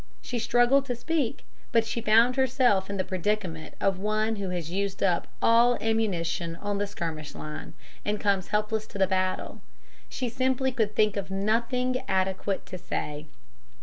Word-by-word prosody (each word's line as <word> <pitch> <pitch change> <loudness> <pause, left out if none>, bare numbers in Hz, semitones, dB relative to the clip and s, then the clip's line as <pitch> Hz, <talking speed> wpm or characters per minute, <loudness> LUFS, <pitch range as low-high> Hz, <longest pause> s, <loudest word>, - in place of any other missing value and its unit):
She 245 - -4
struggled 245 +4 +4
to 245 - -1
speak, 270 0 -1 0.3
but 230 -2 +3
she 235 - -3
found 230 +3 +5
herself 250 -7 +3
in 200 - -3
the 185 - +1
predicament 185 -4 -2
of 195 -2 +1
one 215 +2 0
who 195 -2 -3
has 175 -3 -3
used 195 +1 -1
up 180 -3 +2 0.2
all 235 +1 +5
ammunition 175 -7 0
on 205 +2 -3
the 205 - 0
skirmish 160 -6 -5
line, 155 +1 -7 0.3
and 210 0 -1
comes 195 -2 +1
helpless 215 +1 -1
to - - -8
the 195 - +4
battle. 185 0 -1 0.5
She 255 - -3
simply 260 +2 +1
could 220 -5 -1
think 210 -1 +3
of 195 -1 -3
nothing 235 +6 +1
adequate 190 +1 0
to 185 - -7
say. 150 -3 -4
210 Hz, 165 wpm, -27 LUFS, 185-235 Hz, 0.5 s, found